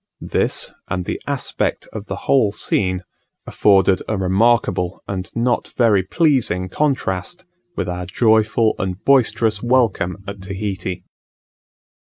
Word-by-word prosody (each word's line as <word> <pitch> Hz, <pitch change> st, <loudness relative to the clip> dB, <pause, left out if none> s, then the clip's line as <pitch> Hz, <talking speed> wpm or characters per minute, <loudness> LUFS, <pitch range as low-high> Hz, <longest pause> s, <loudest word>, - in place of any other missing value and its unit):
This, -, -, 0 dB, 0.2 s
and 90 Hz, 0 st, -3 dB
the -, -, -4 dB
aspect -, -, -2 dB
of 105 Hz, -1 st, -7 dB
the -, -, -3 dB
whole 120 Hz, -7 st, +3 dB
scene, 95 Hz, -2 st, -1 dB, 0.4 s
afforded 95 Hz, -2 st, +3 dB
a 110 Hz, -, -1 dB
remarkable, 95 Hz, -1 st, +1 dB
and 95 Hz, -1 st, -4 dB
not 120 Hz, +1 st, 0 dB
very 110 Hz, -5 st, +4 dB
pleasing 110 Hz, -, +1 dB
contrast, 140 Hz, -, -2 dB, 0.3 s
with 90 Hz, -, -2 dB
our 90 Hz, 0 st, -4 dB
joyful 110 Hz, +2 st, +3 dB
and 95 Hz, -2 st, -2 dB
boisterous 115 Hz, -5 st, +3 dB
welcome 115 Hz, -7 st, +1 dB
at 100 Hz, -1 st, -7 dB
Tahiti. 95 Hz, -2 st, -4 dB
100 Hz, 120 wpm, -20 LUFS, 95-115 Hz, 0.4 s, very